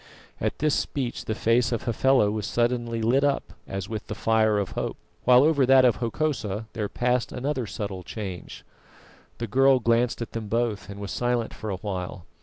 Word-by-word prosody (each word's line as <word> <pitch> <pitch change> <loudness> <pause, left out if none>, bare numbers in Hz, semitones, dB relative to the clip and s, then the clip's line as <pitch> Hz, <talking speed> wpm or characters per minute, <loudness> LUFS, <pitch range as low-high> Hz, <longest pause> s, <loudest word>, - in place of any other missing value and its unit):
At - - -1
this 150 -1 +1
speech, 130 -4 -2
the 110 - -2
face 115 +2 +2
of 115 - -1
Hafela 120 -2 +3
was 105 -1 -3
suddenly 120 -1 0
lit 130 +5 +3
up 140 -1 0
as 95 -1 -4
with 110 -1 -5
the 105 - -4
fire 110 -1 +2
of 100 -2 -2
hope, - - -3 0.3
while 125 +1 +7
over 150 -2 +4
that 130 0 +6
of 120 - +4
Hokosa 115 -4 -2
there 105 -2 -3
passed 125 0 0
another 130 -2 -2
subtle 100 -3 -5
change. 95 -2 -7 0.7
The 115 - -3
girl 135 +4 +4
glanced 115 +1 +2
at 115 - -5
them 115 -2 -5
both 115 -2 -1
and 100 0 -8
was 100 -2 -5
silent 120 -2 -1
for 110 - -6
a 95 - -1
while. 90 -2 -5
115 Hz, 190 wpm, -26 LUFS, 105-125 Hz, 0.7 s, while